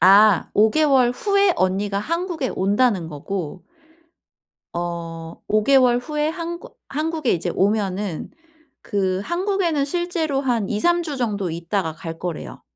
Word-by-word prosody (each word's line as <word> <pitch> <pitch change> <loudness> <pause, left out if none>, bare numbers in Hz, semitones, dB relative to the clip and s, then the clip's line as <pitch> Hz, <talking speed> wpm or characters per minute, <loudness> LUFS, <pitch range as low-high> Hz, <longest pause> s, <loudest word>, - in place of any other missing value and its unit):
아 200 +1 +6
5 215 +1 +4
개월 270 -6 +4
후에 400 +5 +2
언니가 195 +2 0
한국에 335 - -2
온다는 200 -2 +1
거고 175 +3 -5 1.1
어, 170 -1 -5
5 215 0 +2
개월 255 -2 +5
후에 300 +3 -1
한국 345 +7 -6
한국에 310 -2 -1
이제 175 +1 -1
오면은 200 -3 0 0.5
그 190 -2 0
한국에는 345 -5 0
실제로 325 -3 -1
한 235 -7 0
2-3 345 +11 +2
주 300 -4 -4
정도 205 -7 -1
있다가 170 +1 -2
갈 165 +1 -7
거래요. 160 - -6
215 Hz, 235 characters per minute, -22 LUFS, 185-310 Hz, 1.1 s, 아